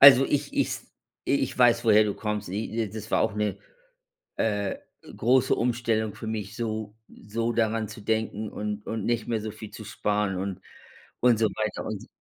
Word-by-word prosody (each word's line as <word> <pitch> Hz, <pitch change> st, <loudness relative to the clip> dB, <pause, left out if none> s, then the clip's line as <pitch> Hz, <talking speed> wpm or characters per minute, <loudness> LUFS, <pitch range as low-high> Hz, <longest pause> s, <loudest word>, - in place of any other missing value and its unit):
Also 135 Hz, -1 st, +11 dB
ich 145 Hz, -1 st, 0 dB
ich -, -, +1 dB, 0.5 s
ich -, -, +1 dB
weiß, -, -, +5 dB
woher 105 Hz, +1 st, +7 dB
du 105 Hz, -, -1 dB
kommst. 105 Hz, -2 st, -3 dB
I 110 Hz, +3 st, -2 dB
das 110 Hz, 0 st, -7 dB
war -, -, +3 dB
auch 105 Hz, -, 0 dB
'ne 105 Hz, -2 st, -1 dB, 0.8 s
äh, 105 Hz, -3 st, 0 dB, 0.4 s
große 125 Hz, +3 st, +4 dB
Umstellung 115 Hz, -3 st, 0 dB
für -, -, -8 dB
mich, 105 Hz, -1 st, -4 dB
so 110 Hz, -2 st, -3 dB
so 115 Hz, +3 st, -3 dB
daran 110 Hz, -1 st, +1 dB
zu 110 Hz, +1 st, -9 dB
denken 110 Hz, 0 st, -1 dB
und 105 Hz, 0 st, -4 dB
und 110 Hz, -3 st, -3 dB
nicht 120 Hz, -1 st, 0 dB
mehr 115 Hz, -2 st, 0 dB
so 110 Hz, -, -4 dB
viel 110 Hz, 0 st, -9 dB
zu 110 Hz, -, -9 dB
sparen 105 Hz, -1 st, 0 dB
und 95 Hz, 0 st, -3 dB, 0.6 s
und 120 Hz, -2 st, +5 dB
so 110 Hz, -, +4 dB
weiter 110 Hz, 0 st, -3 dB
und 110 Hz, +2 st, -5 dB
110 Hz, 175 wpm, -27 LUFS, 105-115 Hz, 0.8 s, Also